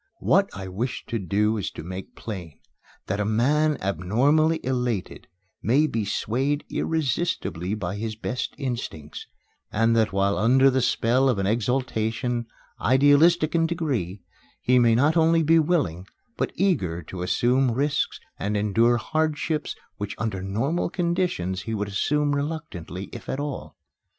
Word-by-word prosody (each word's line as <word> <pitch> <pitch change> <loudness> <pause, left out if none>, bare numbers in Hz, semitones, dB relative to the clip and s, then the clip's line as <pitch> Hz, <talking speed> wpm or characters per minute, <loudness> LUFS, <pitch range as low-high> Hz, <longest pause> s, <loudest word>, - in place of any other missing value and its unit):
What - - +3
I 95 -1 -6
wish 110 +7 -4
to 115 - -1
do 105 +4 +1
is 100 -2 -2
to - - -7
make 95 +3 -7
plain 90 -9 -7 0.5
that 100 +2 -2
a - - +2
man 140 +8 +2
abnormally 135 - +2
elated 125 -6 -2 0.3
may 135 +8 +3
be 115 -8 -1
swayed 130 +8 -1
irresistably 150 - -1
by 105 -1 -4
his 110 +1 -4
best 120 +3 -4
instincts, 120 - -5 0.4
and 115 +2 +2
that 110 -2 +2
while 100 +1 +1
under 130 +5 +5
the 130 0 +1
spell 125 +2 +2
of 125 - +1
an 95 - 0
exaltation, 120 +1 -1 0.3
idealistic 145 +5 +4
in 165 -1 +3
degree, 125 - -2 0.4
he 125 0 +3
may 115 -2 +4
not 145 +7 +3
only 165 0 +4
be 165 +2 +5
willing, 145 - 0 0.3
but - - -1
eager 95 - 0
to 90 +4 -7
assume 125 +8 +2
risks 140 +5 0 0.2
and 105 +1 -1
endure 115 +4 +3
hardships 155 +3 -1 0.2
which 105 -1 -4
under 110 -4 -2
normal 115 - -1
conditions 170 - -1
he 115 +3 -4
would 105 -1 -2
assume 145 +8 +1
reluctantly, 140 - -4
if - - -9
at 135 - -2
all. 145 -1 -5
120 Hz, 145 wpm, -25 LUFS, 100-145 Hz, 0.5 s, under